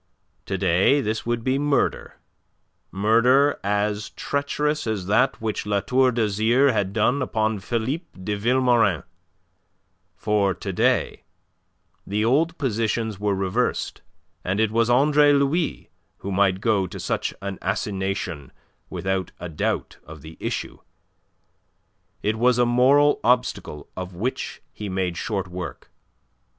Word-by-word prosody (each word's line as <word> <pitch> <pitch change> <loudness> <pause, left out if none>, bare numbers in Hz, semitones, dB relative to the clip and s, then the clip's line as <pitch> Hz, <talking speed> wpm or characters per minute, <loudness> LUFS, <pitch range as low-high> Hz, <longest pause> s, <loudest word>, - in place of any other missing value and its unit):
To - - -2
day 95 +12 +3
this 110 -2 -2
would 120 -1 -1
be 130 +2 +1
murder, 145 -1 0 0.7
murder 115 +8 +3
as 105 +1 -1
treacherous 150 0 -2
as 105 -5 -2
that 110 +7 +2
which 110 -2 -3
La 100 -1 +1
Tour 130 +6 +2
d'Azyr 115 +4 +2
had 100 -3 0
done 115 +6 +1
upon 110 -4 0
Philippe 120 - -3
de 105 +3 -2
Vilmorin; 120 -4 +2 1.1
for 100 -3 +1
to 95 +2 -5
day - - +1 0.9
the 105 +2 0
old 160 +8 +2
positions 110 -4 -1
were 105 -1 0
reversed, 95 -1 -1 0.4
and 95 +3 -1
it 110 -1 +2
was 115 +1 +2
Andre 145 +3 +5
Louis 140 +4 0 0.3
who 100 - -6
might 95 -1 +2
go 100 -4 +1
to - - -8
such - - -2
an 100 -1 -5
assignation 95 -6 -3 0.4
without 95 -1 -2
a 90 - -6
doubt 75 - -2
of 80 -2 -12
the 80 +1 -10
issue. - - -4 1.4
It 110 +2 0
was 125 +1 +4
a 120 - +4
moral 135 +5 +4
obstacle 120 - 0
of 90 -1 -6
which 120 +9 -4
he 105 -2 -6
made 95 -2 -1
short 100 0 -3
work. 90 -6 -7
110 Hz, 130 wpm, -23 LUFS, 95-125 Hz, 1.4 s, Andre